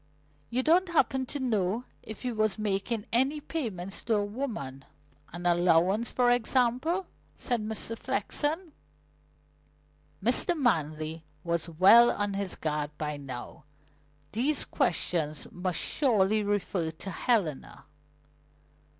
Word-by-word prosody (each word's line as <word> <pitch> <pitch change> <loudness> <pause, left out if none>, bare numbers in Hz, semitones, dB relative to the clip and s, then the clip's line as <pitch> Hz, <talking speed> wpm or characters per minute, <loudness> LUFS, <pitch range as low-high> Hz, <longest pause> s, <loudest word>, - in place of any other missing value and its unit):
"You 255 +2 0
don't 350 +5 +4
happen 265 -6 +1
to 290 - -4
know 220 -3 0 0.2
if 220 - -8
he 250 - -1
was 215 -2 0
making 210 +1 -1
any 265 +5 +2
payments 205 - -4
to 230 - +2
a 205 -1 +1
woman 205 - -5 0.5
an 175 +1 -7
allowance, 175 +5 +3
for 245 -1 +3
example?" 255 - +1 0.3
said 245 -3 -1
Mr. 220 +1 -2
Flexen. 300 - -2 1.5
Mr. 255 - +2
Manley 160 - 0 0.2
was 170 -1 -1
well 195 +9 +7
on 205 -1 -1
his 195 -2 -2
guard 150 -2 -2
by 150 -1 -3
now. 135 +2 -8 0.7
These 265 +7 +1
questions 155 -3 -1
must 180 -1 -2
surely 215 -7 +2
refer 195 -4 -1
to 165 +4 -7
Helena. 185 - -1
210 Hz, 115 wpm, -29 LUFS, 175-245 Hz, 1.5 s, well